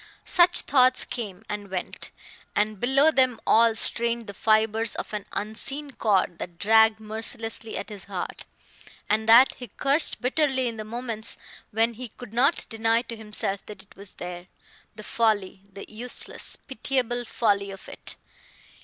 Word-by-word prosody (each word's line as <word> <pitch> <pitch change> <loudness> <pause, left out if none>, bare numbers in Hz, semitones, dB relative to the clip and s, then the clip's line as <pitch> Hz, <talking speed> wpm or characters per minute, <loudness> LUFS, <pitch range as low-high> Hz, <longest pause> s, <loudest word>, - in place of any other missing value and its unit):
Such 350 0 +5
thoughts 255 -2 +3
came, 210 -5 -6
and 205 -1 -5
went; 185 -1 -5 0.5
and 210 -1 0
below 275 +6 +4
them 255 -5 +3
all 230 0 +4
strained 235 +1 -1
the 200 - -8
fibers 220 +1 +3
of - - -6
an 210 -1 -4
unseen 270 +7 -4
cord 195 -8 0
that 170 -1 -7
dragged 220 +2 +4
mercilessly 225 +1 -1
at - - -6
his 205 -3 -9
heart, 190 -3 -6 0.6
and 220 +1 +1
that 240 +4 +8
he 245 - -8
cursed 280 +6 +2
bitterly 260 0 +1
in 230 -1 -4
the 215 - -5
moments 230 0 -3 0.3
when 225 +2 +1
he 250 +2 -7
could 225 0 -13
not 270 +7 +2
deny 225 +1 +1
to 230 -1 -7
himself 210 -2 0
that 205 -2 -10
it 200 - -22
was 200 -1 -7
there.... 180 0 -7 0.5
The 215 - -9
folly, 210 -4 0
the 195 +1 -9
useless, 235 +3 -1
pitiable 245 -2 -2
folly 205 -4 0
of 195 -1 -10
it! - - -6
225 Hz, 155 wpm, -25 LUFS, 210-245 Hz, 0.6 s, that